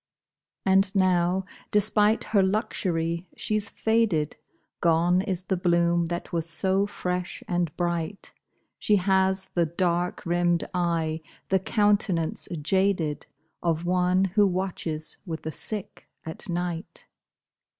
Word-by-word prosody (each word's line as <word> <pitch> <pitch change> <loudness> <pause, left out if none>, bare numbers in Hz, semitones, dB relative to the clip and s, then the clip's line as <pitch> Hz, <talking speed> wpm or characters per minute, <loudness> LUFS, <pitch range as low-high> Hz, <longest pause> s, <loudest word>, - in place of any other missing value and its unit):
And 190 +1 +3
now, 185 0 +2 0.2
despite 210 +1 +4
her 205 -3 +2
luxury, 175 -4 -1
she's 215 0 -1
faded, 220 -10 +1 0.5
Gone 170 +2 +3
is 190 -3 -3
the 190 - -1
bloom 170 -1 +2
that 175 +1 -5
was 165 -1 -1
so 190 +3 +2
fresh 180 -3 -3
and 175 -3 0
bright; 175 +2 -2 0.5
She 210 - +3
has 190 0 +1
the 170 -2 +2
dark 175 +1 -1
rimmed 175 0 +2
eye, 165 -3 0 0.3
the 190 - +3
countenance 200 -5 +1 0.2
jaded, 180 -4 +1 0.3
Of 165 0 0
one 180 +1 +2
who 200 +2 +3
watches 175 -4 -3
with 160 -1 -5
the 160 - -3
sick 210 +5 -6 0.2
at 160 +5 -7
night. 175 0 -4
180 Hz, 120 wpm, -26 LUFS, 170-195 Hz, 0.5 s, despite